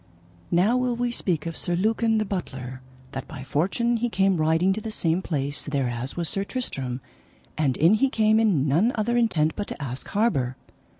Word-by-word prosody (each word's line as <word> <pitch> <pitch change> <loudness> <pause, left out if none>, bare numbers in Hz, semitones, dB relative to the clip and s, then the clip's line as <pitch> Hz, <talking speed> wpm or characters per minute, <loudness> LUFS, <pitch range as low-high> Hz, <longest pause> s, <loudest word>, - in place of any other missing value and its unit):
Now 195 +8 +3
will 250 -1 0
we 240 0 -1
speak 170 -9 -1
of 165 -1 -4
Sir 175 - -1
Lucan 225 +4 +2
the 215 - +1
butler, 130 -10 -5 0.3
that 135 - -6
by 140 -4 -8
fortune 195 - +1
he 240 +1 0
came 195 -3 +2
riding 160 +4 +3
to 215 - -4
the 220 - -5
same 175 -4 0
place 145 -5 -2
thereas 130 -3 -2
was 170 -1 -1
Sir 195 - -1
Tristram, 135 - -4 0.5
and 140 -5 +1
in 165 +6 +5
he 265 +5 +3
came 220 -3 +3
in 185 -11 +3
none 170 - +3
other 235 +2 0
intent 165 -10 +2
but 205 - -3
to - - -6
ask 135 -3 -5
harbour. 140 - 0
180 Hz, 190 wpm, -25 LUFS, 145-220 Hz, 0.5 s, in